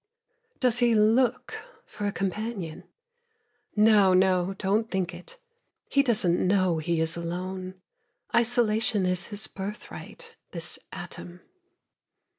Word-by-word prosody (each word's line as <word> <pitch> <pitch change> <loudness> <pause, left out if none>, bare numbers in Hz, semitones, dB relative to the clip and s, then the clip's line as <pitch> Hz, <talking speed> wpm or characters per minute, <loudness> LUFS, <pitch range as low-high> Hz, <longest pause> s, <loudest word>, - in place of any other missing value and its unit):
Does 250 -2 +2
he 240 -2 +4
look 240 - +2 0.3
for 205 - -5
a - - 0
companion? 195 -3 -4 0.9
No, 210 -3 +5
no, 185 0 +2
don't 210 +3 0
think 185 -2 -2
it. 180 - -11 0.5
He 280 - +4
doesn't 210 -10 +1
know 185 -3 +2
he 170 +1 -1
is 160 0 +1
alone; 185 +2 -5 0.6
Isolation 225 -3 +2
is 180 0 0
his 205 -1 0
birthright, 210 - -8 0.2
This - - -2
atom. 175 +1 -9
195 Hz, 110 wpm, -27 LUFS, 180-225 Hz, 0.9 s, No